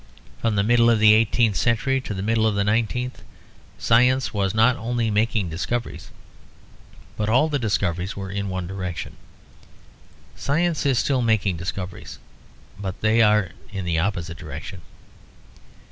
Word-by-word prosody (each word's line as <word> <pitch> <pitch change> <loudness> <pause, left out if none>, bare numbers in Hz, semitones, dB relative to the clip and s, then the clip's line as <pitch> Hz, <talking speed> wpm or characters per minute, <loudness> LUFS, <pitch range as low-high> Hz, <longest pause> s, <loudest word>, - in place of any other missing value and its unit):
From 115 -2 0
the 100 - +2
middle 120 +2 +4
of 115 - +4
the 105 0 +6
eighteenth 110 -1 +2
century 130 +5 +1
to 105 - -6
the 95 - -4
middle 110 +1 +2
of 105 - 0
the 100 - +1
nineteenth, 115 +4 -1 0.6
science 125 +3 +3
was 100 -1 -1
not 115 +3 +4
only 115 -1 -2
making 105 -3 0
discoveries, 115 +9 -4 1.1
but 105 0 -2
all 130 +8 +3
the 145 -2 -1
discoveries 95 -5 -1
were 95 -1 -5
in 100 0 -3
one 95 -1 -3
direction. 90 -1 -5 1.2
Science 165 +1 0
is 135 -3 +2
still 135 0 +1
making 110 -6 +1
discoveries; 90 +2 -6 0.6
but 95 -1 -5
they 110 +1 +3
are 105 -4 +3 0.2
in 95 -2 -5
the 85 -2 0
opposite 85 -2 -3
direction. 85 +3 -8
105 Hz, 145 wpm, -23 LUFS, 95-120 Hz, 1.2 s, the